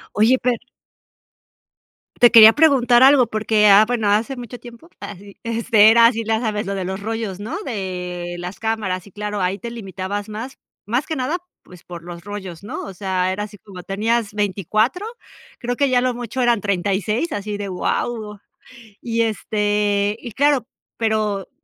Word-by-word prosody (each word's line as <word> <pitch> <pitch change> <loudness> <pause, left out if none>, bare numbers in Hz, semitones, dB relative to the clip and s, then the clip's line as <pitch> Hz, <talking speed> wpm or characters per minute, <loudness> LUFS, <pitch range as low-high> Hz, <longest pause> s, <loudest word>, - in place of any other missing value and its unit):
Oye, 225 +5 +4
per 245 -1 0 1.6
Te 240 - +7
quería 220 -1 +10
preguntar 260 -6 +4
algo, 270 -3 +6
porque, 215 -1 +2
ah, 205 +1 +7
bueno, 235 -4 -1
hace 220 +6 +1
mucho 245 0 -8
tiempo, 240 +7 -14
ah, 205 - -7
sí, 200 +1 -15
este 230 -2 +4
era 230 +1 +6
así, 230 -1 +2
ya 220 0 0
sabes, 215 -3 -2
lo 200 - -2
de 190 -2 -3
los 190 +1 -4
rollos, 220 -2 -4
¿no?, 215 - -5
de 180 -5 -5
las 180 +2 -7
cámaras, 210 -5 -2
y - - -15
claro, 210 +1 -4
ahí 185 +2 0
te 235 +2 -7
limitabas 200 -1 -5
más. 225 +5 -7 0.3
Más 245 +7 -1
que 315 - -3
nada, 265 +7 -1 0.3
pues 180 -2 -16
por 175 -1 -10
los 170 0 -9
rollos, 190 -4 -8
¿no?, 205 - -6
o 195 - -8
sea, 185 -1 -1
era 205 +2 -3
así 210 0 -9
como 190 -3 -11
tenías 215 +2 -1
24, 210 - 0 0.5
creo 245 0 -3
que 280 +2 +1
ya 255 - +2
a - - 0
lo 255 0 0
mucho 240 +1 -4
eran 240 -3 +2
36 200 - -1
así 205 0 -4
de: 205 -1 -5
"Guau," 210 +3 -3 0.6
y 230 -1 -1
este 205 -1 0
y 240 - -8
claro 280 0 +2 0.3
pero 215 -3 -1
215 Hz, 175 wpm, -20 LUFS, 200-235 Hz, 1.6 s, quería